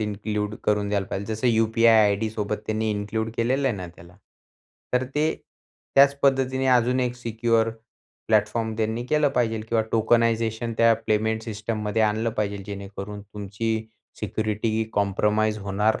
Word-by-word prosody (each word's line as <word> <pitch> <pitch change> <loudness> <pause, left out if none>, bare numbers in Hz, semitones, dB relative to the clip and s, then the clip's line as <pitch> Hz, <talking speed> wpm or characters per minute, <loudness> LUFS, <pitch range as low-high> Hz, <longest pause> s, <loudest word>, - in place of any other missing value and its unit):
Include 105 0 -2
करून 105 -1 +1
द्यायला 100 -1 -1
पाहिजे. 100 +3 -4
जसं 110 +4 -1
यू-पी-आय 115 0 +4
आयडीसोबत 105 0 -1
त्यांनी 110 0 -1
इन्क्लूड 105 +2 -2
केलेलं 130 +4 +1
आहे 115 - -2
ना 90 -2 -6
त्याला. 85 +1 -15 0.8
तर 125 +1 +2
ते 155 +2 +1 0.6
त्याच 140 +1 +6
पद्धतीने 135 -1 +2
अजून 125 0 +3
एक 125 -1 -1
सिक्युअर 115 -1 +1 0.6
प्लॅटफॉर्म 110 +1 +1
त्यांनी 110 +2 -1
केलं 150 +1 +3
पाहिजे 115 -3 +1
किंवा 115 -1 +2
टोकनायझेशन 115 0 +1
त्या 115 0 +6
पेमेंट 110 +1 +1
सिस्टममध्ये 110 0 -2
आणलं 110 +2 +1
पाहिजे 100 -1 -1
जेणेकरून 100 0 -7
तुमची 105 +2 -4 0.3
सिक्युरिटी 110 +1 -2
ही 110 - +1
कॉम्प्रोमाईज 105 +2 +1
होणार 100 +2 0
110 Hz, 140 wpm, -24 LUFS, 105-115 Hz, 0.8 s, त्याच